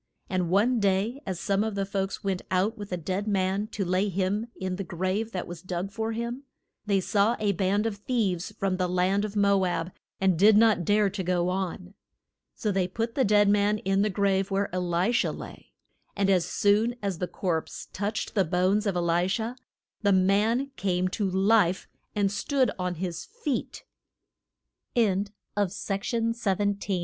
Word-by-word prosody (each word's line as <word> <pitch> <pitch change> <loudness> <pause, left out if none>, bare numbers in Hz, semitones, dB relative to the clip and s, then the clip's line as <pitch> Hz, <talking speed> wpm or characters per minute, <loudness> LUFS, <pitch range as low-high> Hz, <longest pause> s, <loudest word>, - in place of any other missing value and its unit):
And 180 -2 0
one 225 +7 +3
day 205 +6 +1
as 185 -3 -3
some 200 +1 +1
of 220 -2 -3
the 195 -1 -1
folks 195 0 -3
went 190 -2 -1
out 190 +5 +1
with 205 -3 -8
a 180 - -1
dead 185 +5 -3
man 195 +1 0
to 205 -3 -3
lay 185 +3 +1
him 195 +4 -1
in 185 -1 -3
the 195 - -3
grave 185 +6 -2
that 180 -4 -3
was 175 -1 -8
dug 185 +1 -4
for 225 +1 -2
him, 235 +3 -4 0.5
they 200 -2 +3
saw 210 +4 +2
a 210 -1 +2
band 195 +3 +1
of 220 -3 -2
thieves 205 -5 -1
from 195 -1 0
the 180 -1 0
land 185 +3 +1
of 210 0 -6
Mo 200 -1 +3
ab 175 -1 -1 0.3
and 190 -4 +2
did 210 +2 +7
not 215 -5 +4
dare 205 0 +3
to 195 0 -3
go 180 -1 0
on. 185 0 -3 0.6
So 210 - -1
they 190 -2 +1
put 225 +5 -3
the 265 - +2
dead 205 -1 +4
man 205 +1 +3
in 195 -1 +1
the 210 - +2
grave 195 0 +1
where 195 0 0
E - - -1
li 180 +4 +1
sha 240 - +2
lay. - - -9 0.4
And 195 -1 +2
as 180 -3 +2
soon 215 +4 +2
as 195 -4 -2
the 180 - -1
corpse 170 -4 -3
touched 205 +2 -3
the 200 - +3
bones 185 +5 +1
of 195 - 0
E - - +1
li 170 +1 +2
sha 220 +5 -1 0.5
the 205 -2 +3
man 210 +8 +2
came 180 0 0
to 200 +1 -1
life 190 -1 +3 0.3
and 200 -2 +2
stoo 260 +7 +1
195 Hz, 175 wpm, -27 LUFS, 185-210 Hz, 0.6 s, did